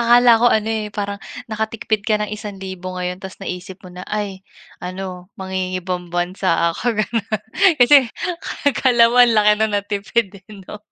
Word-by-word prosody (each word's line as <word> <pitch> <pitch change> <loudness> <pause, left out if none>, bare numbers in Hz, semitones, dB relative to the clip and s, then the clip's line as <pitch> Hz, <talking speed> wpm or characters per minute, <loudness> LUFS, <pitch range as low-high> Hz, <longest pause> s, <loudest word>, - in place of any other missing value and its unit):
Akala 240 0 +6
ko 240 - +5
ano, 215 0 +1
eh, 220 -1 -2
parang 200 -1 -3 0.3
nakatipid 220 -1 -2
ka 215 -1 +2
ng 210 - -2
1,000 190 -3 -7
ngayon 180 0 -3
tapos 190 -1 -9
naisip 180 +1 -6
mo 185 - -11
na, 180 +1 -8
"Ay, 200 -2 -4 0.4
ano 185 0 -6
mangingibang 185 -1 -3
bansa 175 -1 +1
ako." 235 -3 -2
Ganun. 215 +1 -2 0.5
Kasi 285 +4 +8 0.7
akala 245 -4 +4
mo 240 - -1
ang 245 -1 +6
laki 210 0 +5
ng 220 -1 +1
natipid, 205 +2 -1
eh, 210 - -16
'no? 210 - -9
205 Hz, 160 wpm, -20 LUFS, 185-220 Hz, 0.7 s, Kasi